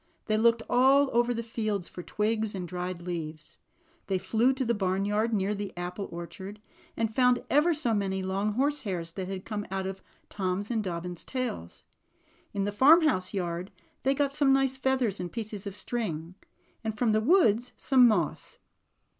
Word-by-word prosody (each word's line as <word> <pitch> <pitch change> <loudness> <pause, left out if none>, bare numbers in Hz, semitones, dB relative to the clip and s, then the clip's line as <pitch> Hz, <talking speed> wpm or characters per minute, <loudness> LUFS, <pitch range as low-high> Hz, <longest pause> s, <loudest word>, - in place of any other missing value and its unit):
They 215 - +1
looked 230 +1 +3
all 265 +3 +4
over 240 +1 +3
the 235 -1 -2
fields 215 -5 -2
for 180 - -8
twigs 215 +2 -1
and 180 -2 -4
dried 180 0 -4
leaves. 160 -3 -6 0.5
They 195 - +1
flew 225 +7 +2
to 260 0 -2
the 235 - +2
barnyard 205 +3 0
near 205 -1 +1
the 200 -3 -6
apple 180 +3 -4
orchard, 190 +4 -8 0.4
and 225 -1 0
found 250 +1 +3
ever 300 +5 +4
so 285 -7 +1
many 190 -2 -1
long 195 +3 -1
horsehairs 210 - -1
that 185 +1 -5
had 190 -1 -5
come 210 -2 -3
out 190 0 -2
of 190 0 -5 0.3
Tom^s 195 +2 -2
and 225 -2 0
Dobbin's 175 -1 -5
tails. 250 - -5 0.7
In 200 - -1
the 205 - -1
farmhouse 270 - +5
yard 180 -1 -3 0.3
they 270 +1 +2
got 280 0 0
some 285 -2 +3
nice 270 -1 +3
feathers 260 -6 0
and 175 -1 -4
pieces 215 -3 -5
of 200 - -6
string, 175 -9 -4 0.5
and 220 -1 -3
from 230 0 +2
the 215 0 +3
woods 245 - +3
some 255 -3 +5
moss. 185 -9 -1
210 Hz, 170 wpm, -28 LUFS, 185-245 Hz, 0.7 s, farmhouse